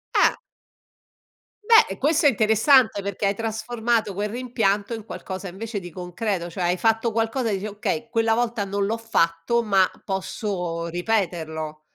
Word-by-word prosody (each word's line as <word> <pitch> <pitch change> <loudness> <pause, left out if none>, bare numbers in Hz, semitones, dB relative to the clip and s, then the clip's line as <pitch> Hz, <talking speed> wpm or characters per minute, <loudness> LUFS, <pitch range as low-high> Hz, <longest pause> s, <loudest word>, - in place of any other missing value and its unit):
Eh. - - +5 1.3
Beh, 455 +1 +6
eh, - - -11
questo 305 +3 +2
è - - +9
interessante 220 0 +4
perché 200 +1 -3
hai 200 - 0
trasformato 225 -1 -1
quel 205 +2 -2
rimpianto 225 -3 -1
in 220 -2 -5
qualcosa 190 -3 -6
invece 215 +3 -5
di 175 -2 -9
concreto; 180 +1 -3
cioè 180 +1 -4
hai 175 +1 +1
fatto 225 +2 +1
qualcosa 225 +2 0
e - - 0
dici: 200 - -6
"Okay, 230 +3 -3
quella 225 -1 +2
volta 235 -2 0
non 200 0 -1
l'ho 225 +3 -1
fatto, 225 0 +1
ma 195 -4 +4 0.2
posso 180 -3 -3
ripeterlo". 165 -5 -2
210 Hz, 155 wpm, -24 LUFS, 185-230 Hz, 1.3 s, è